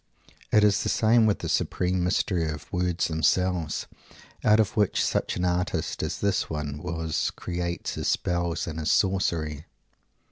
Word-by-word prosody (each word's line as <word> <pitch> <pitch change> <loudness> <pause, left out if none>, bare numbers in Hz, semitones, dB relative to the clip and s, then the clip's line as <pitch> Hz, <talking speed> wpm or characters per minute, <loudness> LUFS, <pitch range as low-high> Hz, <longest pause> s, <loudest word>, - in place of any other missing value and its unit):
It 105 - +5
is 105 0 +4
the 105 - -1
same 110 +2 +4
with 105 - +2
that - - -5
supreme 90 0 0
mystery 90 -2 0
of 75 0 -7
words 90 -1 0
themselves, 80 0 0 0.6
put 105 +1 +4
of 110 -4 +1
which 105 -3 +2
such - - -1
an 90 - -1
artist 90 0 -1
as - - -2
this 100 -2 0
one 75 -2 -4
was 80 -1 -2
creates 85 -1 -3
his - - -3
spells 85 -1 0
and 80 -1 -5
his 75 - -1
sorcery. 80 -6 +1
90 Hz, 155 wpm, -26 LUFS, 80-95 Hz, 0.6 s, It